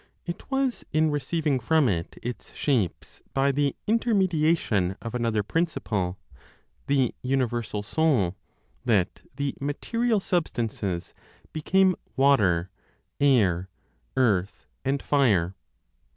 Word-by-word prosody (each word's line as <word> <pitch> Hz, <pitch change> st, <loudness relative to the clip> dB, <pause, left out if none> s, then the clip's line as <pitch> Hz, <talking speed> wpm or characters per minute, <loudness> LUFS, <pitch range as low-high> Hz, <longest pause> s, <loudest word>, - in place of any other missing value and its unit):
It 175 Hz, 0 st, -6 dB
was 270 Hz, -2 st, 0 dB
in 155 Hz, 0 st, +3 dB
receiving 145 Hz, 0 st, 0 dB
from 155 Hz, +4 st, +3 dB
it 85 Hz, -6 st, -2 dB
its 120 Hz, 0 st, -6 dB
shapes 120 Hz, -, -1 dB
by 135 Hz, +1 st, +3 dB
the 140 Hz, 0 st, 0 dB
intermediation 170 Hz, -, +2 dB
of 115 Hz, -, -6 dB
another 115 Hz, -3 st, 0 dB
principle, 105 Hz, -, -1 dB, 0.7 s
the 135 Hz, -4 st, +2 dB
universal 120 Hz, -5 st, -1 dB
Soul, 120 Hz, -, +1 dB, 0.5 s
that 105 Hz, -8 st, +1 dB
the 140 Hz, -1 st, -1 dB
(material) 225 Hz, +11 st, 0 dB
substances 115 Hz, -, -2 dB, 0.4 s
became 185 Hz, +4 st, +3 dB, 0.2 s
water, 100 Hz, -11 st, +3 dB, 0.5 s
air, 95 Hz, -10 st, +3 dB, 0.5 s
earth 105 Hz, -7 st, +1 dB, 0.2 s
and 135 Hz, +1 st, -1 dB
fire. 105 Hz, -, +2 dB
135 Hz, 100 wpm, -26 LUFS, 105-155 Hz, 0.7 s, in